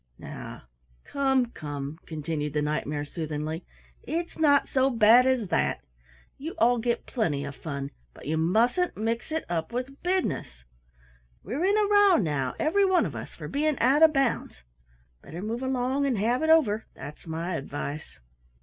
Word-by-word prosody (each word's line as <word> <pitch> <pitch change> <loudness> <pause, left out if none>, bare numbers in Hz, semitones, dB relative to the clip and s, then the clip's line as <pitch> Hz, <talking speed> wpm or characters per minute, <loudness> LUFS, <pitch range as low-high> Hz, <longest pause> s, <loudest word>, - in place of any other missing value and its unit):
"Now, - - -9 0.4
come, 265 -3 +1
come," 145 +1 -6
continued 155 -2 -3
the 150 - +1
Knight 150 -1 -1
mare 145 0 -3
soothingly, 155 +1 -5 0.3
"it's 335 +1 -4
not 285 -3 +4
so 265 0 +2
bad 235 +1 +6
as 250 -7 +1
that. - - 0 0.6
You 315 +5 -6
all 240 +1 +4
get 235 +1 -1
plenty 155 - -1
of 140 0 -7
fun, 140 -3 -5 0.2
but - - -14
you 155 - -1
mustn't 225 - +2
mix 230 +6 -2
it 320 0 -2
up 165 -2 -2
with 255 +3 -5
business. 355 - -2 0.8
We're 255 - -3
in 405 +2 +3
a 420 -1 +3
row 410 -2 +6
now, 145 - 0
every 370 +6 +2
one 375 -2 +3
of - - -5
us, - - -8
for - - -7
being 300 +1 0
out 280 +4 +3
of 320 -1 +8
bounds. 270 - -1 0.6
Better 165 - -9
move 225 +5 -3
along 260 +1 0
and 250 -5 0
have 235 +6 +1
it 315 - +1
over, 230 -10 +4
that's 150 +4 -10
my 165 +3 -3
advice." 145 - -6
230 Hz, 170 wpm, -27 LUFS, -, 0.8 s, of